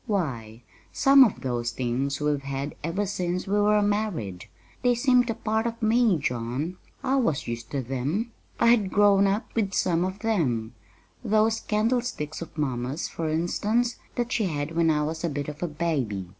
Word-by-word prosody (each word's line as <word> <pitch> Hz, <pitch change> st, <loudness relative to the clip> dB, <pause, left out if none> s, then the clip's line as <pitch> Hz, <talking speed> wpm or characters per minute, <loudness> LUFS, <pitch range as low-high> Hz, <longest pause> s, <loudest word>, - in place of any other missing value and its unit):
Why, 120 Hz, -, -3 dB, 0.3 s
some 275 Hz, 0 st, +7 dB
of 225 Hz, -, 0 dB
those 120 Hz, -2 st, -1 dB
things 130 Hz, +3 st, -2 dB
we've 150 Hz, -1 st, 0 dB
had 140 Hz, +1 st, -4 dB
ever 175 Hz, +6 st, -1 dB
since 180 Hz, -2 st, -2 dB
we 205 Hz, +2 st, +1 dB
were 210 Hz, 0 st, +4 dB
married. 205 Hz, -, -2 dB, 0.4 s
They 245 Hz, -1 st, +3 dB
seemed 250 Hz, 0 st, +3 dB
a 230 Hz, -, -1 dB
part 220 Hz, 0 st, -1 dB
of 230 Hz, 0 st, -5 dB
me, 225 Hz, -3 st, +3 dB
John. 130 Hz, +5 st, -3 dB, 0.3 s
I 270 Hz, 0 st, +2 dB
was 195 Hz, -, 0 dB
used 115 Hz, 0 st, -5 dB
to 140 Hz, -2 st, -2 dB
them. 140 Hz, -, -2 dB, 0.3 s
I -, -, +3 dB
had 220 Hz, -5 st, +4 dB
grown 200 Hz, -1 st, +4 dB
up 200 Hz, +3 st, -2 dB
with 205 Hz, -4 st, 0 dB
some 175 Hz, -1 st, +2 dB
of 185 Hz, +1 st, -3 dB
them 130 Hz, -, 0 dB, 0.5 s
those 220 Hz, 0 st, +2 dB
candlesticks 215 Hz, -, -1 dB
of 165 Hz, -, -9 dB
mamma's, 130 Hz, +1 st, -2 dB
for 160 Hz, -1 st, -3 dB
instance, 210 Hz, +9 st, 0 dB, 0.2 s
that 240 Hz, 0 st, -2 dB
she 220 Hz, -, +1 dB
had 150 Hz, -2 st, -3 dB
when 165 Hz, -1 st, +3 dB
I 150 Hz, -1 st, +2 dB
was 160 Hz, +2 st, -4 dB
a 170 Hz, -, +1 dB
bit 145 Hz, -1 st, -4 dB
of 150 Hz, +1 st, -7 dB
a 175 Hz, -, 0 dB
baby. 140 Hz, -, -2 dB
170 Hz, 180 wpm, -26 LUFS, 140-215 Hz, 0.5 s, some